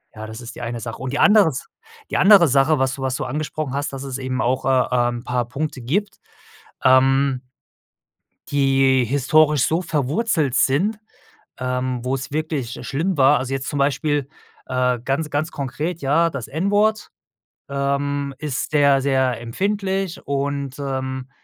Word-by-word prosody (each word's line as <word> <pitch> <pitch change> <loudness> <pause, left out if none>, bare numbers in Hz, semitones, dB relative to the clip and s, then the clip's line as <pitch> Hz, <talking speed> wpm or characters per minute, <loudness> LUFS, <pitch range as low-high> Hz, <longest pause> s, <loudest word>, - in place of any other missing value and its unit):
Ja, 110 0 -7
das 110 0 -8
ist 120 0 -9
die - - -9
eine 120 0 -4
Sache. 115 0 -6
Und 130 -1 -4
die 145 - -1
andere 205 -4 +6
S 135 - -6 0.4
die - - +1
andere 195 -3 +7
Sache, 140 +3 +3
was 135 0 +1
du 140 - -9
was 130 -1 -1
du - - -3
angesprochen 150 0 -4
hast, 140 +1 -2
dass 135 - -6
es 135 -1 -4
eben 130 -1 -3
auch, 130 +2 0
äh, 130 -2 +3 0.2
ähm, 120 - -4
'n 120 - -12
paar 125 -1 -1
Punkte 135 +1 -4
gibt, 195 - -2 0.6
ähm 130 0 +4 1.1
die 135 -2 +3
historisch 145 +3 +3
so 165 +3 0
verwurzelt 155 - 0
sind, 190 +14 +2 0.6
ähm, 125 -1 -2
wo's 135 +1 -3
wirklich, 150 -6 -3
äh, - - -9
schlimm 160 +5 -2
war. 130 -2 +5
Also, 130 +1 -4
jetzt 135 -1 -3
zum 145 - -3
Beispiel, 140 0 0 0.4
äh, 125 -1 0
ganz 145 +4 -1
ganz 155 +3 -1
konkret, 150 +5 -4
ja, 160 +5 +2
das 140 -6 -6
N-Wort 205 +6 +1 0.6
ähm 140 0 -1
ist 145 -3 -3
sehr, 140 -2 +4
sehr 130 -3 +1
empfindlich 195 - -2
und, 140 -1 -2
ähm, 130 -1 -4
140 Hz, 165 wpm, -21 LUFS, 130-155 Hz, 1.1 s, andere